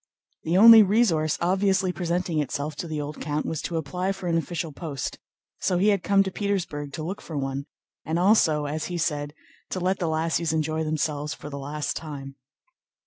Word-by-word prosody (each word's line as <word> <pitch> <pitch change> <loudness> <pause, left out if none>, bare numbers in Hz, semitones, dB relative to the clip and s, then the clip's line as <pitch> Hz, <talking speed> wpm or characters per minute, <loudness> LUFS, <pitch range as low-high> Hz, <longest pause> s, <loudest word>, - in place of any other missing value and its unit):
The 165 +3 +1
only 225 +2 +10
resource 190 -7 +2
obviously 190 +1 +2
presenting 175 -2 -1
itself 145 +1 -2
to 170 - -4
the 155 -2 -3
old 150 +1 -6
count 150 0 -2
was 160 -2 -3
to 170 - -3
apply 180 +5 -2
for 190 -1 -9
an 170 - +1
official 165 0 -2
post, 140 -3 -5 0.4
so 180 - +1
he 200 +4 +4
had 200 -3 +2
come 200 +1 +4
to 190 - -4
Petersburg 175 -8 -2
to 155 - -4
look 185 +5 -5
for 160 - -6
one 135 0 -3 0.4
and 160 +1 -1
also, 175 -6 +4
as 155 +2 -3
he 175 - -4
said, 150 -3 -2 0.3
to 185 - -3
let 185 +1 0
the 175 - -1
lassies 160 +1 0
enjoy 155 0 0
themselves 150 -1 -2
for 150 - -9
the 140 - -5
last 145 +2 -3
time. 140 -3 -7
160 Hz, 195 wpm, -25 LUFS, 150-185 Hz, 0.4 s, only